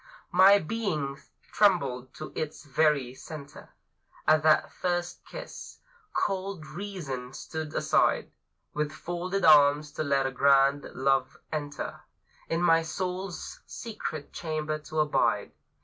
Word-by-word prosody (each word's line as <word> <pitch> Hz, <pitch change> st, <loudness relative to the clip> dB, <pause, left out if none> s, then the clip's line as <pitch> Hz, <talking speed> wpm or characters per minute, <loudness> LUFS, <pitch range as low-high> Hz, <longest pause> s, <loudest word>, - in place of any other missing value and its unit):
My 190 Hz, +3 st, +8 dB
being 155 Hz, -8 st, -2 dB, 0.3 s
trembled 140 Hz, -, +2 dB
to 155 Hz, -, -7 dB
its 155 Hz, -1 st, -4 dB
very 145 Hz, -3 st, +2 dB
center 140 Hz, +1 st, -10 dB, 0.6 s
At 155 Hz, 0 st, +5 dB
that 155 Hz, 0 st, +4 dB
first 175 Hz, -1 st, -2 dB
kiss. -, -, -9 dB, 0.3 s
Cold 190 Hz, -4 st, -2 dB
Reason 155 Hz, -7 st, -6 dB
stood 155 Hz, +1 st, -6 dB
aside -, -, +2 dB, 0.4 s
With 150 Hz, 0 st, -1 dB
folded 175 Hz, +4 st, -2 dB
arms 145 Hz, -1 st, +6 dB
to 155 Hz, -, -3 dB
let 140 Hz, -2 st, +2 dB
a 135 Hz, -, 0 dB
grand 140 Hz, +1 st, +4 dB
Love 135 Hz, +1 st, +1 dB
enter 145 Hz, -2 st, -4 dB, 0.5 s
In 165 Hz, +1 st, 0 dB
my 165 Hz, -1 st, +5 dB
Soul's 180 Hz, +3 st, -4 dB
secret 205 Hz, -10 st, -6 dB
chamber 155 Hz, -2 st, -3 dB
to 155 Hz, 0 st, -1 dB
abide. 150 Hz, -1 st, +1 dB
155 Hz, 115 wpm, -28 LUFS, 140-175 Hz, 0.6 s, My